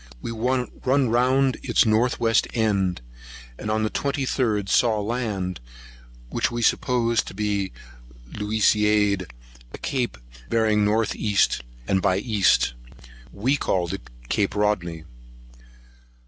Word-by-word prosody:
We 115 - -5
run 125 +2 -1 0.4
round 130 +3 +2
its - - +2
north 115 +3 +2
west 115 -1 +2
end, 100 - +1 0.6
and 105 - -5
on 110 0 +1
the 110 - 0
23d 130 -7 -1
saw 110 +1 +3
land, 105 -5 -3 0.7
which - - 0
we 120 0 -3
supposed 115 -2 +1
to - - -8
be 100 -2 -1 0.5
the - - -10
Luisiade, 105 -2 +2 0.4
a - - -8
cape 125 - -2 0.3
bearing 110 -2 +2
north 110 +1 +1
east 100 - +1 0.3
and 95 -1 +2
by 95 -2 +2
east. 105 - +2 0.6
We 130 +8 0
called 90 -9 -1
it 95 - -7 0.2
Cape 100 - 0
Rodney. 90 -6 -1
105 Hz, 120 wpm, -24 LUFS, 100-120 Hz, 0.7 s, saw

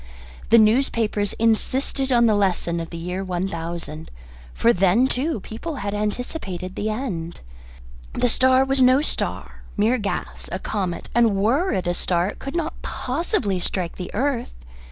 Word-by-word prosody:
The 230 - +7
newspapers 220 -2 +2
insisted 260 +4 0
on 240 -1 +5
the 220 - +4
lesson 185 -4 +1
of 165 0 -5
the 170 - -7
year 180 +3 -3
1000 170 -4 -4 0.4
for 235 - +3
then, 195 +7 +4
too, 265 +1 -1
people 265 - -6
had 200 -6 -3
anticipated 205 - -3
the 215 - -2
end. 195 -8 -4 0.7
The - - +1
star 260 +2 +4
was 270 0 +1
no 255 +3 +5
star - - -3 0.2
mere 225 +5 +3
gas 205 -1 -4
a - - -1
comet; 190 -2 -3
and 230 -3 +4
were 250 - +2
it 185 - -1
a 175 - +1
star 175 +1 0
it - - -9
could 275 +4 -6
not 330 -2 -3
possibly 255 - -1
strike 175 -1 -3
the 180 - -5
earth. 255 +1 -1
215 Hz, 155 wpm, -23 LUFS, 185-255 Hz, 0.7 s, The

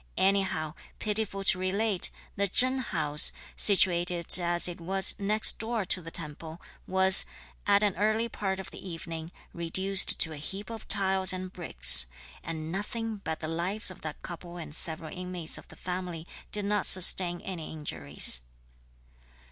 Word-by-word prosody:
Anyhow, 190 -5 -1 0.2
pitiful 210 -2 -2
to 185 - +1
relate, 195 +1 -2 0.3
the 200 0 -2
Chen 255 +7 +1
house, 150 -10 +1 0.2
situated 175 -3 +4
as 175 0 +3
it 175 -1 -9
was 190 +3 +1
next 210 +2 +3
door 225 -2 -4
to 185 - -2
the 165 - -10
temple, 160 0 -7 0.3
was, 190 0 +5 0.4
at 200 0 +2
an 205 -3 -1
early 215 +3 -1
part 195 -4 -5
of 190 - -10
the - - -13
evening, 165 -2 -9 0.2
reduced 190 +3 +5
to 160 - +3
a - - -10
heap 195 +9 -8
of 225 - -10
tiles 190 -1 +2
and 185 0 -6
bricks; - - +5 0.4
and 160 0 -7
nothing 220 +3 -6
but 160 -5 -7
the 155 - -5
lives 180 +6 -3
of 185 - -15
that 155 -2 -9
couple 175 0 -10
and 155 -3 -8
several 160 +1 -5
inmates 180 -3 -1
of - - -18
the - - -16
family 180 -3 -7 0.3
did 210 -1 0
not 210 -1 +1
sustain 180 -1 +5
any 180 -4 -8
injuries. 75 - 0
185 Hz, 155 wpm, -26 LUFS, 165-200 Hz, 0.4 s, was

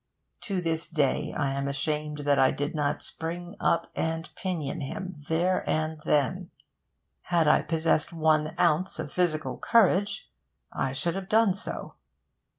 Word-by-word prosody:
To 195 -4 -1
this 165 -1 -1
day 145 -5 +1
I 135 - 0
am 140 0 -2
ashamed 150 +1 -2
that 145 -1 +3
I 130 - +6
did 145 +4 -2
not 150 -2 -1
spring 175 +2 -5
up 170 0 +2
and 160 0 -2
pinion 175 -3 -3
him, 160 +3 -6
there 175 +3 +2
and 155 0 -1
then. 170 +6 +1 0.8
Had 170 -3 +2
I 150 - +5
possessed 160 -1 +1
one 155 -2 +2
ounce 170 +3 +2
of 150 - -5
physical 165 -3 0
courage, 205 - +2 0.4
I 135 - -1
should 165 +6 -1
have 195 0 -5
done 220 -3 +4
so. 200 +4 -6
160 Hz, 150 wpm, -28 LUFS, 150-180 Hz, 0.8 s, I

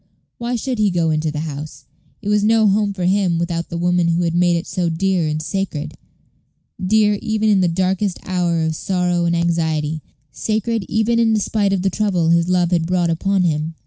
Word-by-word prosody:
Why 240 +1 -2
should 245 0 -3
he 210 -1 +3
go 170 -3 +1
into 155 0 0
the 150 0 -4
house? 145 -3 -7 0.4
It 205 - -3
was 210 0 +2
no 220 +1 +4
home 205 +1 +2
for 185 -3 -3
him 185 -2 +2
without 170 0 -2
the 170 - -4
woman 175 0 +1
who 170 +1 +1
had 165 -1 0
made 175 0 +3
it 170 - -2
so 175 -1 -1
dear 180 0 0
and 155 0 -2
sacred 155 -3 -3 0.9
dear 210 +1 +3
even 220 0 0
in 200 -2 +4
the 180 - +3
darkest 185 +2 0
hour 175 -3 0
of 160 0 -1
sorrow 180 -1 0
and 170 0 +1
anxiety, 160 -2 -1 0.3
sacred 220 - -2
even 225 +2 +1
in 225 -1 +3
despite 205 -1 0
of 190 -2 0
the 195 - +1
trouble 185 -5 0
his 170 +1 +3
love 180 -1 +2
had 165 -2 +1
brought 175 -2 +1
upon 195 +3 +1
him. 160 -1 -1
180 Hz, 205 wpm, -19 LUFS, 165-200 Hz, 0.9 s, no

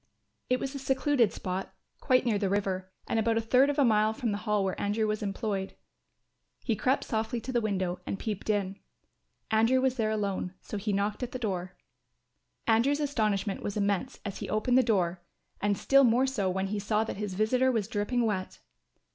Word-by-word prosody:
It 255 0 +2
was 270 0 -4
in - - -4
a - - -6
secluded 265 -4 +2
spot, 185 0 -5 0.2
quite 255 -2 +3
near 220 -4 +1
the 195 -2 0
river, 190 -2 -1 0.2
and 225 - +1
about 225 0 +2
a - - +4
third 250 +5 +4
of 290 - -1
a 285 - +5
mile 215 -1 +3
from 235 -2 -2
the 205 - -2
Hall 210 -1 +2
where 190 - -2
Andrew 210 +2 +1
was 215 0 -1
employed. 200 -1 -3 0.9
He 230 - 0
crept 260 +6 +1
softly 225 0 -2
to 245 +3 -6
the 240 -2 +1
window 190 -4 -1
and - - -2
peeped 210 0 -4
in. 200 -2 0 0.7
Andrew 225 +4 +4
was 260 0 +1
there 220 -2 +1
alone. 200 -3 -2
So 210 - -6
he 205 +1 -2
knocked 205 +3 -1
at 250 -1 -4
the - - -2
door. 185 -6 -3 0.9
Andrew's 240 +6 +3
astonishment 215 -9 0
was 205 - -3
immense 200 +5 -1
as 200 - -5
he - - -5
opened 245 +4 +3
the - - +7
door 185 -7 +1 0.4
and 205 -1 +1
still 275 0 +5
more 245 +1 +4
so 225 -8 0
when 190 +1 -1
he 210 0 -2
saw 210 +2 +1
that 225 - -5
his 205 -2 -4
visitor 250 +6 +2
was 220 -5 -1
dripping 230 +2 0
wet. 190 -4 -2
215 Hz, 205 wpm, -29 LUFS, 200-245 Hz, 0.9 s, the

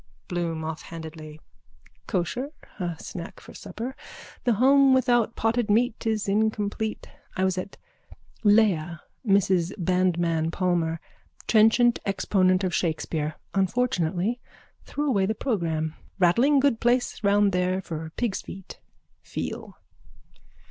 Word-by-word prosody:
BLOOM: 170 -2 -2
(Offhandedly.) 160 -1 -7 0.7
Kosher. 200 - -2 0.3
A 175 -2 -2
snack 170 +2 -8
for - - -14
supper. 250 +4 -7 0.5
The 240 - +4
home 270 +4 +5
without 240 -3 +2
potted 225 0 0
meat 225 +1 +1
is 215 -2 0
incomplete. 215 +1 -1 0.3
I 190 - +1
was 190 -1 +2
at 185 +2 -6 0.7
Leah, 190 -7 +3 0.2
Mrs 190 -4 +2
Bandmann 175 -3 +1
Palmer. 170 -3 0 0.5
Trenchant 230 +2 +4
exponent 185 -1 +2
of 185 -2 -1
Shakespeare. 155 -2 -1 0.2
Unfortunately 195 0 0 0.5
threw 295 +1 -2
away 200 -8 +2
the 220 - -1
programme. 165 - -1 0.2
Rattling 235 +11 +4
good 270 -5 +2
place 245 -1 +1
round 200 0 +4
there 180 0 +1
for 160 -3 -6
pigs' 235 -5 -1
feet. 190 -1 -10 0.4
Feel. - - -6
195 Hz, 115 wpm, -26 LUFS, 170-225 Hz, 0.7 s, home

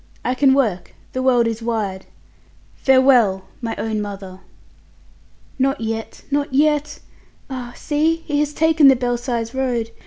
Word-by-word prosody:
I 250 - +1
can 265 +1 +4
work. 215 -10 -1 0.2
The 255 - -2
world 250 -2 +3
is 230 0 -2
wide. 210 -5 -3 0.7
Farewell! 255 -8 +4 0.2
my 230 -2 -3
own 220 -1 -2
mother!" 195 -2 -7 1.2
"Not 270 +2 +1
yet, 225 0 -5
not 285 0 0
yet! 295 +2 +1 0.5
Ah! 245 -2 -6
see 310 +2 0
he 295 -2 -1
has 295 0 0
taken 320 -1 +4
the 270 - +7
Belsize 240 -1 -2
Road. 245 -4 -1
250 Hz, 135 wpm, -20 LUFS, 225-275 Hz, 1.2 s, the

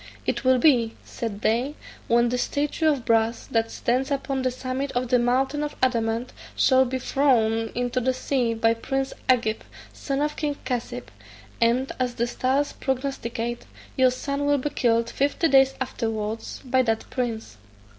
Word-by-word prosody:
It - - -1
will 260 0 +5
be' 240 -5 +3
(said 215 -3 -5
they) 245 +7 +1 0.3
'when 235 +1 +3
the 250 - 0
statue 295 +5 0
of 275 -6 -1
brass, 225 0 +1
that 225 0 +1
stands 255 +5 -1
upon 275 -1 -1
the 255 - +1
summit 255 +2 -3
of 245 0 -1
the 250 -1 +4
mountain 265 +4 +1
of 295 0 -3
adamant, 235 -1 0 0.2
shall 260 -1 +4
be 260 +1 -2
thrown 225 -5 +2
into 245 +1 0
the 255 +1 +1
sea 250 -2 0
by 225 0 +3
prince 270 +4 -2 0.2
Agib, 230 -4 +2 0.3
son 275 -1 -3
of 300 0 -1
king 295 -2 -2
Cassib; 250 -2 -4 0.5
and, 240 +3 +2
as 250 -1 -1
the 235 - 0
stars 265 +4 0
prognosticate, 240 -3 -3 0.3
your 260 -1 +5
son 280 +3 -2
will 290 0 +4
be 285 +2 -2
killed 230 -4 +2
fifty 285 +6 +1
days 270 -2 +5
afterwards 225 -4 -3
by 260 0 +3
that 225 -3 -1
prince.' 225 - -3
255 Hz, 165 wpm, -25 LUFS, 230-270 Hz, 0.5 s, will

